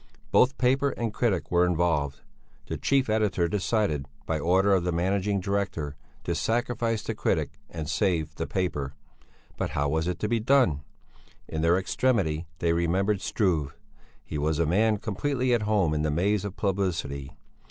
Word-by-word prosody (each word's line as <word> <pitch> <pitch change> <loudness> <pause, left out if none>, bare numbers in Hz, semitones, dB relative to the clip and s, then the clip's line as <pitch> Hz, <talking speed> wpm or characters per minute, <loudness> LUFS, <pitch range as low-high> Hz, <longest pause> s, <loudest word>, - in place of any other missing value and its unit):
Both 130 +1 +4
paper 135 +3 +3
and 115 -4 -3
critic 95 -11 0
were 90 0 +4
involved. 80 -5 +1 0.4
The - - -4
chief 135 -1 +1
editor 105 -5 +1
decided, 95 -6 0 0.2
by 80 -1 -1
order 95 +5 +3
of 95 -3 +2
the 90 - 0
managing 95 +4 0
director, 95 -7 -2 0.3
to - - -1
sacrifice 115 -1 0
the 115 - -3
critic 75 -8 -1
and 80 -3 -5
save 85 -2 0
the 80 - -4
paper. 75 -7 -2 0.6
But - - -1
how 70 +1 +1
was 80 +2 0
it 90 -2 -1
to 105 - +1
be 115 +1 +1
done? 115 - +3 0.7
In 80 - -3
their 85 +2 +4
extremity 95 -6 0
they 85 0 +1
remembered 95 +4 +1
Struve. 80 -10 0 0.5
He 75 - -4
was 75 +1 0
a 85 - +2
man 105 +6 +3
completely 125 +5 -1
at 120 - +2
home 95 -8 +2
in 75 - 0
the 75 - 0
maze 95 +6 +1
of 100 -1 -5
publicity. 85 -9 -2
90 Hz, 165 wpm, -27 LUFS, 80-105 Hz, 0.7 s, Both